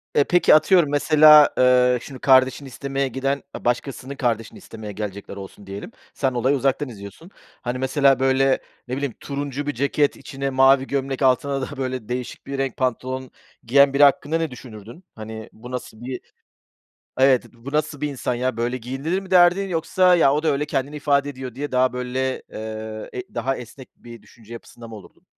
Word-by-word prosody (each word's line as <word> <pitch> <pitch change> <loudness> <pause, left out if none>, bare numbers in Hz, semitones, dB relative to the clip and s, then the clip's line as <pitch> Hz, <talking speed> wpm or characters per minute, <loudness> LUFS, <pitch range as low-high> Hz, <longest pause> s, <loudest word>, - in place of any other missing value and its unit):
Eee, 145 - +5
peki, 175 -1 +4
atıyorum, 155 0 +4
mesela, 150 0 +7
eee, 125 -1 +4
şimdi 135 -2 -10
kardeşini 130 +1 +3
istemeye 135 +2 -3
giden, 135 +2 -2
eee, - - -9
başkasının 130 +2 -2
kardeşini 115 -4 -2
istemeye 110 -2 -9
gelecekler 100 -1 -6
olsun 100 0 -11
diyelim. 100 +3 -8 0.2
Sen 135 -2 -1
olayı 125 +3 +1
uzaktan 135 +1 0
izliyorsun. 105 - -11 0.3
Hani, 120 +1 -3
mesela 135 +1 +2
böyle, 135 0 +2 0.3
ne 125 - -3
bileyim, 140 -4 -3
turuncu 145 0 -5
bir 145 - -1
ceket, 140 +3 +1
içine 135 0 -5
mavi 135 0 +4
gömlek, 135 -1 -3
altına 135 +1 +2
da 140 +1 -6
böyle 130 -4 -4
değişik 125 0 -5
bir 140 0 -4
renk 135 -1 -2
pantolon 130 0 -3 0.3
giyen 140 +3 +4
biri 145 - +4
hakkında 150 +2 +2
düşünürdün? 120 - -12
Hani, 110 0 -8
bu 125 +3 -12
nasıl 120 -3 -7
bir 125 +1 -6 1.0
Evet, 130 -1 +4
b 120 +1 -22
bu 140 - -5
nasıl 150 -1 -2
bir 150 - 0
insan 125 -2 -3
ya, 130 +1 -2
böyle 120 +2 -1
giyinilir 135 +9 -3
mi 190 -1 -13
derdin 180 +2 +5
yoksa 180 +2 +2
"Ya, 140 -5 +4
o 150 +2 -1
da - - 0
öyle 150 0 +1
kendini 140 +1 -3
ifade 140 -1 +1
ediyor." 130 -3 -8
diye 145 +1 -5
daha 130 0 +2
böyle, 130 +1 -3
eee, 110 0 -7
e 380 0 -8
daha 135 0 -1
esnek 125 +2 -11
bir 120 -2 -12
düşünce 115 -1 -15
yapısında 115 0 -11
mı 110 - -10
olurdun? 100 - -15
130 Hz, 180 wpm, -22 LUFS, 125-140 Hz, 1.0 s, mesela